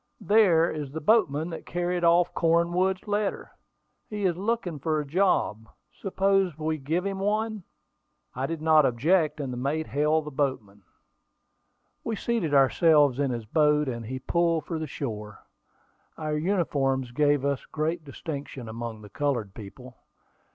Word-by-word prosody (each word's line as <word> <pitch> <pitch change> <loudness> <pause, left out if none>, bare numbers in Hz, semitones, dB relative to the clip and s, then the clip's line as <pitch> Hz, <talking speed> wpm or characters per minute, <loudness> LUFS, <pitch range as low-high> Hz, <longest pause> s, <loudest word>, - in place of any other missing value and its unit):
"There 190 -5 +4
is 150 -3 -5
the 160 - -3
boatman 160 -3 +2
that 165 - -8
carried 175 0 -2
off 170 +1 +4
Cornwood's 175 +4 +1
letter. 205 -1 -2 0.6
He 210 -2 -3
is 175 -3 +2
looking 195 -5 -2
for 155 +1 0
a 150 - -3
job: 140 - 0 0.2
suppose 195 -3 0
we 155 0 -2
give 160 +7 -1
him 195 -1 -3
one?" 215 +1 -1 0.7
I 130 +2 -2
did 165 0 -5
not 155 -1 +6
object, 155 +7 +2
and 135 -3 -3
the - - -5
mate 145 +5 -1
hailed 150 +2 +1
the 150 - -6
boatman. 130 -8 -2 1.2
We 225 - -2
seated 220 -8 -1
ourselves 145 0 +4
in 140 -1 +1
his 120 -3 -4
boat, 150 +4 +2
and 120 -2 -4
he 130 +2 -4
pulled 165 +3 0
for 165 -2 -4
the 155 - -4
shore. 105 -7 -6 0.7
Our 155 -1 -2
uniforms 145 -7 0
gave 145 +1 +2
us 140 -2 -2
great 160 +2 -2
distinction 140 -4 -7
among 110 -1 -6
the 105 - -11
colored 120 -7 -2
people. 120 +4 -11
155 Hz, 150 wpm, -26 LUFS, 135-175 Hz, 1.2 s, not